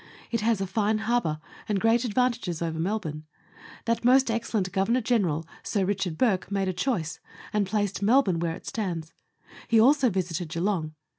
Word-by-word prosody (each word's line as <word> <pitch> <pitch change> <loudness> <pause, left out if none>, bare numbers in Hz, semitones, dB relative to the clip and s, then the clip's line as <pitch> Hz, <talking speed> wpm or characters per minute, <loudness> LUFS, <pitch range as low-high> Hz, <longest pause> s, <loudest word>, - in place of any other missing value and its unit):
It 230 -2 0
has 225 -1 +2
a 195 - -1
fine 210 +3 +1
harbour, 220 -8 0 0.3
and 205 -2 +1
great 225 +4 +3
advantages 235 -7 0
over 165 -1 -3
Melbourne. 165 -5 -2 0.6
That 230 0 0
most 255 0 +5
excellent 220 -4 -1
Governor 215 +6 +1
General 190 - +1 0.2
Sir 205 - -1
R. 195 -2 -1
Bourke, 200 +1 +1
made 195 -1 0
a 185 - 0
choice, 180 - -2 0.3
and 210 -2 +1
placed 205 -1 -1
Melbourne 205 -5 +3
where 165 -1 -1
it - - -13
stands. 170 -7 -4 0.5
He 230 - +4
also 265 +2 +5
visited 175 -4 -2
Geelong. 165 -2 -1
200 Hz, 165 wpm, -27 LUFS, 175-230 Hz, 0.6 s, most